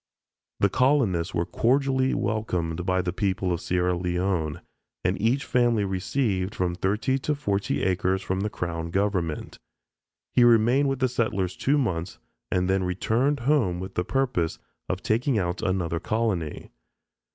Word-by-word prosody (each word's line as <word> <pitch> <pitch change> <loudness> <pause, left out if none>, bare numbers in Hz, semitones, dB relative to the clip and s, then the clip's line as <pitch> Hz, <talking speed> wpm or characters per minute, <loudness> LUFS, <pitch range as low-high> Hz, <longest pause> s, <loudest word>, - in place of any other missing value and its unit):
The 100 - +6
colonists 105 - +2
were 85 0 +1
cordially 130 +3 +1
welcomed 90 -5 -2
by 95 0 +2
the 90 - -2
people 95 -2 0
of 85 - -3
Sierra 90 0 +1
Leone, 90 -3 -1 0.4
and - - 0
each 125 +6 +1
family 120 -4 +2
received 95 0 -1
from 90 -1 0
thirty 105 +9 0
to 150 +3 -1
forty 100 - -1
acres 95 0 +1
from 95 0 -2
the 105 +2 -1
Crown 85 -3 -4
Government. 95 -4 -1 0.7
He 125 - +5
remained 120 +4 +5
with 135 -1 -2
the 130 - +4
settlers 100 -7 -1
two 140 +2 +1
months 90 - -2 0.3
and 90 0 +1
then 95 0 +1
returned 115 +9 0
home 120 -10 +2
with 95 +1 -6
the 90 - 0
purpose 125 -8 0 0.3
of 90 0 -2
taking 120 +2 +1
out 90 -3 -1
another 85 -3 -1
colony. 95 -5 -2
95 Hz, 150 wpm, -26 LUFS, 90-120 Hz, 0.7 s, The